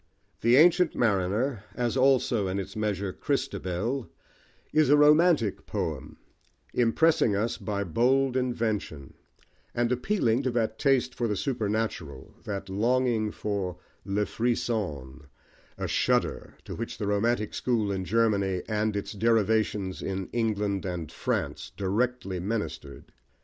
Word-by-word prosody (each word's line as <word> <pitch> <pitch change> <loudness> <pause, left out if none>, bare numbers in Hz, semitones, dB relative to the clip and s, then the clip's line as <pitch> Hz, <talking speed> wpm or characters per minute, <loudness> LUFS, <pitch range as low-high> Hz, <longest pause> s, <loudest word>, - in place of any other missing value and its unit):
The 120 +2 +4
Ancient 175 +3 +5
Mariner, 105 +2 0
as 120 -1 -1
also, 130 -6 +3
in 95 +1 -2
its 100 +2 -5
measure, 100 -3 -2
Christabel, 105 +6 -2 0.6
is 155 -2 +4
a 145 - +6
"romantic" 150 - +4
poem, 75 -5 -4 0.6
impressing 120 -1 +3
us 110 +4 -1
by 100 -2 -2
bold 125 +8 +2
invention, 110 - -2 0.6
and 120 0 +1
appealing 125 - +1
to 130 - -1
that 110 -2 -1
taste 130 -2 +2
for 120 - -1
the 105 - -1
supernatural, 105 - -3
that 100 -1 -4
longing 115 +2 +1
for 100 -6 -3 0.3
le 100 +1 0
frisson, 90 - -2 0.5
a - - -3
shudder, - - 0
to - - -6
which - - -5
the 105 - -3
"romantic" 105 +2 0
school 110 -5 0
in 95 -1 -2
Germany, 100 -2 +1
and 110 -1 0
its 100 - -3
derivations 105 -3 +1
in 95 -1 -4
England 105 -5 0
and 90 -4 -4
France, - - -3
directly 100 -1 -1
ministered. 85 -8 -5
110 Hz, 125 wpm, -27 LUFS, 95-120 Hz, 0.6 s, a